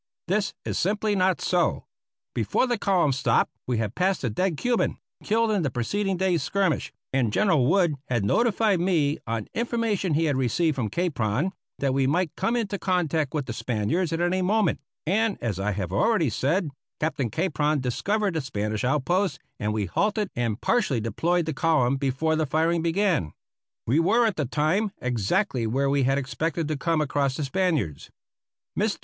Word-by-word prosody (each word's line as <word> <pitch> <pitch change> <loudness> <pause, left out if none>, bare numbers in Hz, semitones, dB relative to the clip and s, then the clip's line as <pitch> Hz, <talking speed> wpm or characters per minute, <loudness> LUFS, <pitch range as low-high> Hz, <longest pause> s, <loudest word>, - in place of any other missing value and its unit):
This 200 +3 0
is - - -2
simply 210 +2 +1
not 185 -1 +2
so. 180 -1 +1 0.5
Before - - +1
the 240 -3 -1
column 180 -8 +2
stopped 135 0 +2 0.2
we 125 -2 0
had 110 -1 -2
passed 185 +2 0
a 120 - 0
dead 180 - 0
Cuban, 245 - 0 0.3
killed 225 +1 +2
in 205 -3 +1
the 145 - 0
preceding 190 - -1
day's 180 -2 +1
skirmish, 195 -5 0 0.2
and 125 -5 +2
General 160 - +3
Wood 175 -1 +3 0.2
had 120 -5 0
notified 215 - +2
me 160 -5 +1
on 115 -1 -2
information 225 -7 0
he 165 +2 +2
had 145 -3 +1
received 135 +5 +1
from 120 -6 -2
Capron 140 - 0 0.3
that 135 -2 0
we 135 -1 +2
might 165 +3 0
come 235 - 0
into 205 -4 -2
contact 160 -6 0
with 145 -3 -1
the 120 - -5
Spaniards 120 - -1
at 165 - -1
any 175 +2 +1
moment, 200 -2 +1 0.3
and, 210 +5 +1
as 105 -6 -3
I 105 +2 0
have 95 -3 -3
already 205 - +2
said, 150 - 0 0.3
Captain 150 -6 -1
Capron 150 - 0
discovered 195 - 0
the 160 - -1
Spanish 105 -4 -3
outpost, 175 +9 +1 0.2
and 105 0 -1
we 105 -1 -1
halted 210 - 0
and 115 -3 -1
partially 140 - +1
deployed 165 - 0
the 160 - -2
column 140 -4 +2
before 140 +4 0
the 155 -1 0
firing 165 +4 +1
began. 170 - +1 0.5
We 135 +8 +2
were 230 +8 +3
at 220 - +1
the 150 - -1
time 155 - 0
exactly 125 - 0
where 135 +4 +1
we 140 0 +2
had 135 +1 +2
expected 145 +4 -2
to 155 - 0
come 165 +2 0
across 140 -2 0
the 150 - -2
Spaniards. 145 - -1 0.7
Mr. - - 0
160 Hz, 180 wpm, -25 LUFS, 130-190 Hz, 0.7 s, General